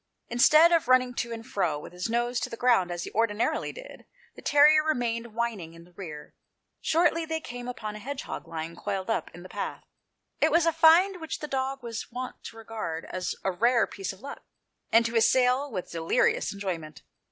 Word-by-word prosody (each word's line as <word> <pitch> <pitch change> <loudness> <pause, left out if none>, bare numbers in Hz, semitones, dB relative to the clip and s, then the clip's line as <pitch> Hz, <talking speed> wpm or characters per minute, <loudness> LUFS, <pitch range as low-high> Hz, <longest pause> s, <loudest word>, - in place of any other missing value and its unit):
Instead 305 +8 +6
of 335 -2 +3
running 255 -1 +4
to 235 -1 -3
and 225 0 -6
fro, 175 -10 -1
with 150 - -10
his 180 +4 -4
nose 240 +1 0
to - - -3
the 230 - -7
ground, 235 -8 +3
as 175 -1 -4
he - - -7
ordinarily 225 0 0
did, - - -12 0.3
the - - -12
terrier 300 +1 +6
remained 235 -6 -2
whining 215 -9 -3
in 165 - -13
the 175 - -20
rear. 155 -6 -9 0.5
Shortly, 330 0 +2
they 320 0 -2
came 245 -5 -8
upon 215 -4 -5
a - - -7
hedgehog 275 +5 -6
lying 165 0 -5
coiled 195 +1 -3
up - - -1
in 175 - -12
the - - -9
path; - - -5 0.6
it - - +4
was 335 0 +4
a 330 - +3
find 335 +4 +5
which 320 - -4
the 300 - -6
dog 270 -1 -2
was 230 0 -6
wont 255 +1 -6
to 225 - -9
regard 215 -8 -5
as 185 -1 -3
a 190 - +1
rare 235 +5 +3
piece 195 -2 -5
of 190 +1 -14
luck, 280 +2 -8 0.5
and 230 +1 +5
to 230 +1 -2
assail 255 +4 +3
with 185 -5 -5
delirious 165 -1 +1
enjoyment. 175 -7 -5
235 Hz, 200 wpm, -27 LUFS, 190-275 Hz, 0.6 s, Instead